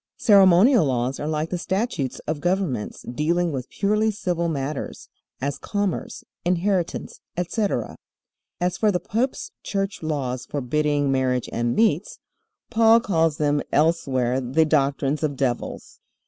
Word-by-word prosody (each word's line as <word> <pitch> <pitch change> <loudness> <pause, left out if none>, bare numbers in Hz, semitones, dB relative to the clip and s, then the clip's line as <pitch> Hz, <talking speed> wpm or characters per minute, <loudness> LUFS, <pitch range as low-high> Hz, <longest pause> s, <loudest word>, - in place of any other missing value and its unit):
Ceremonial 200 - +6
laws 130 0 -1
are 150 - -3
like 155 +1 -2
the 180 - -2
statutes 190 - -2
of 150 -1 -3
governments 175 - -1
dealing 165 +7 0
with 130 -3 -5
purely 210 +2 +1
civil 180 -5 -1
matters, 140 -1 -4 0.3
as 140 +2 -3
commerce, 205 -3 -3 0.2
inheritance, 180 0 -1 0.2
etc. 195 +4 -1 0.6
As 180 0 -1
for 215 -2 +3
the 180 - 0
pope's 230 +9 -2
church 195 0 -3
laws 135 -5 -3
forbidding 145 +1 0
marriage 130 -2 0
and 120 0 0
meats, 365 - +1 0.5
Paul 225 0 +6
calls 165 - +1
them 145 -1 +1
elsewhere 135 -5 +1
the 135 +6 +2
doctrines 140 -1 +1
of 150 -3 -1
devils. 130 -3 -3
160 Hz, 130 wpm, -23 LUFS, 135-195 Hz, 0.6 s, Ceremonial